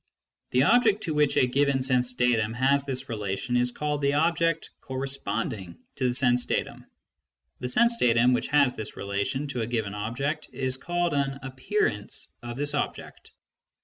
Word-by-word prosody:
The 125 Hz, +1 st, +3 dB
object 220 Hz, -, +4 dB
to 160 Hz, -, -2 dB
which 150 Hz, -1 st, +2 dB
a -, -, +5 dB
given 135 Hz, +1 st, +1 dB
sense 125 Hz, -1 st, +1 dB
datum 115 Hz, -3 st, +1 dB
has; 135 Hz, +3 st, +2 dB
this 135 Hz, -1 st, -4 dB
relation 105 Hz, +2 st, -3 dB
is 125 Hz, 0 st, +3 dB
called 150 Hz, +2 st, -2 dB
the 140 Hz, 0 st, +2 dB
object 165 Hz, +1 st, +1 dB
" -, -, -50 dB
corresponding 130 Hz, -8 st, -3 dB
" -, -, -48 dB
to 130 Hz, -, +1 dB
the 120 Hz, -, -1 dB
sense 125 Hz, -1 st, +3 dB
datum; -, -, -3 dB, 0.7 s
the 125 Hz, -, -3 dB
sense 235 Hz, -, +3 dB
datum 120 Hz, -, +4 dB
which 125 Hz, -, 0 dB
has 140 Hz, -3 st, +3 dB
this 110 Hz, -, -4 dB
relation 100 Hz, +8 st, -2 dB
to 125 Hz, -3 st, -2 dB
a 110 Hz, -, -2 dB
given 110 Hz, -4 st, -2 dB
object 135 Hz, +9 st, -3 dB
is 130 Hz, -1 st, 0 dB
called 175 Hz, +4 st, -1 dB
an 140 Hz, -1 st, 0 dB
" -, -, -17 dB
appearance 135 Hz, -, -2 dB
" -, -, -48 dB
of 120 Hz, -1 st, -7 dB
this 145 Hz, +1 st, 0 dB
object. 145 Hz, -, -4 dB
130 Hz, 180 wpm, -27 LUFS, 120-145 Hz, 0.7 s, a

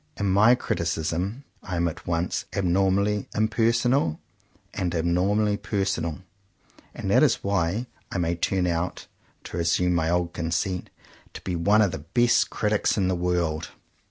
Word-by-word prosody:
In 100 Hz, -2 st, 0 dB
my 110 Hz, +6 st, +6 dB
criticism 85 Hz, -, -2 dB, 0.2 s
I 90 Hz, -, -5 dB
am 85 Hz, 0 st, +1 dB
at 80 Hz, -, -7 dB
once 85 Hz, +1 st, -1 dB
abnormally 100 Hz, +2 st, +1 dB
impersonal, 115 Hz, -, +2 dB, 0.5 s
and 90 Hz, -2 st, -2 dB
abnormally 100 Hz, +5 st, +1 dB
personal; 95 Hz, -6 st, -2 dB, 0.7 s
and -, -, -3 dB
that -, -, +5 dB
is -, -, +3 dB
why 100 Hz, +3 st, 0 dB, 0.3 s
I -, -, -2 dB
may 85 Hz, -1 st, 0 dB
turn 90 Hz, +2 st, 0 dB
out 85 Hz, +1 st, -2 dB, 0.2 s
— -, -, -37 dB
to -, -, -7 dB
resume 85 Hz, +1 st, +2 dB
my 80 Hz, -2 st, +1 dB
old 85 Hz, 0 st, 0 dB
conceit 85 Hz, +2 st, -2 dB, 0.2 s
— -, -, -27 dB
to -, -, -7 dB
be 90 Hz, -, -3 dB
one 100 Hz, +6 st, +4 dB
of 100 Hz, -, +1 dB
the 80 Hz, -, -5 dB
best 120 Hz, -, +2 dB
critics 105 Hz, 0 st, 0 dB
in 95 Hz, -2 st, +2 dB
the 95 Hz, -, +1 dB
world. 85 Hz, -3 st, -1 dB
90 Hz, 155 wpm, -25 LUFS, 85-100 Hz, 0.7 s, my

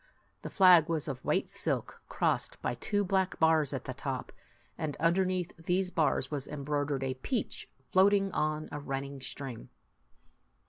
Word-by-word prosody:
The -, -, -6 dB
flag 180 Hz, -4 st, +6 dB
was 160 Hz, -2 st, -1 dB
of 130 Hz, -3 st, -5 dB
white -, -, +1 dB
silk, -, -, -2 dB
crossed -, -, 0 dB
by -, -, 0 dB
two 205 Hz, -, -1 dB
black 190 Hz, -1 st, 0 dB
bars 160 Hz, -3 st, +4 dB
at 135 Hz, -, -4 dB
the 130 Hz, -, -4 dB
top; 135 Hz, -1 st, -4 dB, 0.4 s
and 155 Hz, -3 st, -3 dB
underneath 180 Hz, +1 st, +1 dB
these 180 Hz, +2 st, 0 dB
bars 155 Hz, -5 st, +1 dB
was 140 Hz, -3 st, -3 dB
embroidered 145 Hz, -1 st, -2 dB
a 130 Hz, -1 st, -1 dB
peach 215 Hz, -, -3 dB, 0.2 s
floating 195 Hz, +1 st, +4 dB
on 155 Hz, -1 st, -1 dB
a 145 Hz, -, -4 dB
run 135 Hz, -1 st, -3 dB
ning 140 Hz, -1 st, -9 dB
stream. 130 Hz, -3 st, -6 dB
155 Hz, 155 wpm, -31 LUFS, 135-180 Hz, 0.4 s, flag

